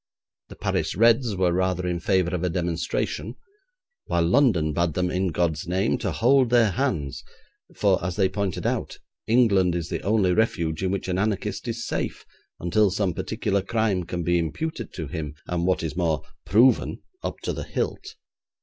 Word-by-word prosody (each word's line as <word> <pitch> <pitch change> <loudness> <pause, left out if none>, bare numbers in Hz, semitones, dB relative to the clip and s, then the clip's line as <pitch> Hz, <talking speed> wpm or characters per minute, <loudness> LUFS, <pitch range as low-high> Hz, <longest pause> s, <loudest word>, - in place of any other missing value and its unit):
The - - -10
Paris - - -1
Reds 115 +1 +4
were 90 -2 +2
rather 90 0 0
in 90 -1 -1
favour 90 0 +1
of 90 -1 -1
a 90 - +1
demonstration, 85 +6 -2 0.7
while 85 - +1
London 90 - +3
bade 85 -1 0
them, 90 0 0
in 95 +1 0
God's 85 0 -1
name, 95 +5 +1
to - - -2
hold 130 +1 +3
their 115 -3 +4
hands, 95 - -2 0.5
for, - - +2
as 90 0 -2
they 95 -2 +3
pointed 95 -1 -3
out, - - -2 0.3
England 100 -7 +4
is 85 -1 -3
the - - -3
only 100 -2 +2
refuge 85 -7 0
in 95 - 0
which 95 0 -2
an 95 0 -1
anarchist 105 +1 -2
is 120 0 -3
safe - - -3 0.3
until 100 +5 +2
some 95 -1 0
particular 105 +1 -1
crime 105 -2 0
can 85 0 -4
be 85 +1 +2
imputed 155 - -3
to 80 - -4
him, 75 +1 -5
and 85 0 -1
what 95 - +1
is 80 -2 -3
more, 85 -3 0 0.2
proven 120 +6 +3 0.2
up - - -4
to - - -2
the - - -5
hilt. 420 +2 -4
95 Hz, 175 wpm, -25 LUFS, 85-110 Hz, 0.7 s, Reds